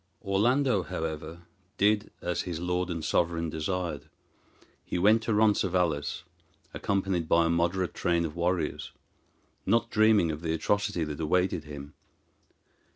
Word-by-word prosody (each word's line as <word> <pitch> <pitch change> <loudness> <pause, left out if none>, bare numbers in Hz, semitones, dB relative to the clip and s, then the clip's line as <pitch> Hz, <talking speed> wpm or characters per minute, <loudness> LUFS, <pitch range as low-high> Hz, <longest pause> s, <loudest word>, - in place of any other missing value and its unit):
Orlando, 115 +3 +2
however, 80 0 -5 0.3
did 105 +1 +2
as 90 0 -1
his 85 -3 -5
lord 90 +1 -1
and 85 -3 -3
sovereign 85 -1 0
desired. 85 +3 -3 0.7
He - - -3
went 105 +5 +4
to 110 0 -1
Roncesvalles, 90 -8 +1 0.5
accompanied 95 -4 -1
by 85 0 +4
a - - +1
moderate 85 +2 0
train 85 -2 +1
of 80 0 -6
warriors, 85 +1 -1 0.7
not 115 +3 +1
dreaming 110 -6 +4
of 75 0 -6
the 80 -1 -1
atrocity 100 +1 0
that 75 -2 -5
awaited 90 0 0
him. 70 -1 -9
90 Hz, 130 wpm, -28 LUFS, 80-100 Hz, 0.7 s, went